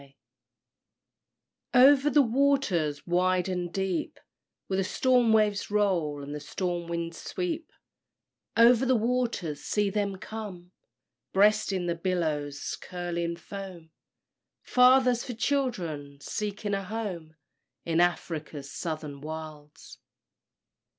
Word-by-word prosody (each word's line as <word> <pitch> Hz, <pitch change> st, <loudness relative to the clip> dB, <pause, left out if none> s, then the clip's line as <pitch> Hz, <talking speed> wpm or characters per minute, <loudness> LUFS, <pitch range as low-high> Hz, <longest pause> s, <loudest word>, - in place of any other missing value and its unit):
_ 140 Hz, -1 st, -19 dB, 1.6 s
Over 275 Hz, +3 st, +7 dB
the 295 Hz, -1 st, +5 dB
waters 230 Hz, -, +1 dB
wide 180 Hz, +1 st, +2 dB
and 180 Hz, -2 st, -3 dB
deep 190 Hz, -2 st, -2 dB, 0.5 s
Where 190 Hz, -, -2 dB
the 195 Hz, -, +2 dB
storm 245 Hz, +3 st, +3 dB
waves 210 Hz, -2 st, +2 dB
roll, 175 Hz, -9 st, 0 dB
and 145 Hz, +1 st, -6 dB
the 150 Hz, -, -4 dB
storm 175 Hz, +3 st, -3 dB
winds 170 Hz, -1 st, -4 dB
sweep, 335 Hz, -3 st, -4 dB, 0.9 s
Over 235 Hz, +1 st, +6 dB
the 260 Hz, 0 st, +3 dB
waters 230 Hz, -, -1 dB
see 205 Hz, -1 st, 0 dB
them 200 Hz, -1 st, -1 dB
come! 190 Hz, -3 st, -8 dB, 0.6 s
Breasting 200 Hz, -2 st, +3 dB
the 170 Hz, -, 0 dB
billows' 160 Hz, -5 st, -2 dB
curling 170 Hz, -1 st, -3 dB
foam, 175 Hz, -2 st, -9 dB, 0.7 s
Fathers 250 Hz, -1 st, +5 dB
for 250 Hz, -, -5 dB
children 175 Hz, -, -2 dB
seeking 205 Hz, +5 st, -3 dB
a 195 Hz, 0 st, -1 dB
home 185 Hz, -6 st, -5 dB, 0.5 s
In 165 Hz, 0 st, +2 dB
Afric's 155 Hz, -5 st, -2 dB
Southern 155 Hz, -4 st, -5 dB
Wilds. 155 Hz, -1 st, -9 dB
185 Hz, 110 wpm, -28 LUFS, 165-220 Hz, 1.6 s, Over